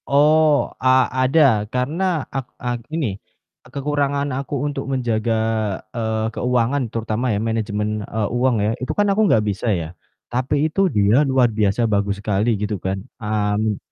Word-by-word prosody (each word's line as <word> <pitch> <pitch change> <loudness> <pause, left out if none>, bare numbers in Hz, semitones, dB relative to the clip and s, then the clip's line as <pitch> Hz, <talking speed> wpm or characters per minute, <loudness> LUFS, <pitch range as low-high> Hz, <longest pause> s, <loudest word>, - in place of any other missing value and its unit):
Oh, 150 +1 +4
a 130 - +3 0.3
ada 135 +5 +3 0.3
karena 155 +6 -1
ak 135 -2 -2
eee, 125 0 -2
gini, 155 -3 -1 0.5
eee, - - -19
kekurangan 140 0 -1
aku 135 +2 -4
untuk 140 -2 -3
menjaga, 115 -4 0 0.5
eee, 110 -2 -1
keuangan 125 +3 +1
terutama 115 +2 -2
ya 105 - +1
manajemen, 105 -1 -2
eee, 105 +1 -2
uang 125 0 +2
ya, 110 - +1
itu 130 - -4
kan 205 - +3
aku 215 - +1
enggak 110 -1 +3
bisa 105 +3 -2
ya, 85 -5 -1 0.4
tapi 135 +4 +1
itu 195 -1 +3
dia 105 +2 +3
luar 125 -3 +3
biasa 105 +2 +1
bagus 100 -2 0
sekali 105 +2 0
gitu 105 +1 -2
kan, 95 +1 -2 0.2
mmm 105 0 0
120 Hz, 155 wpm, -21 LUFS, 105-140 Hz, 0.5 s, Oh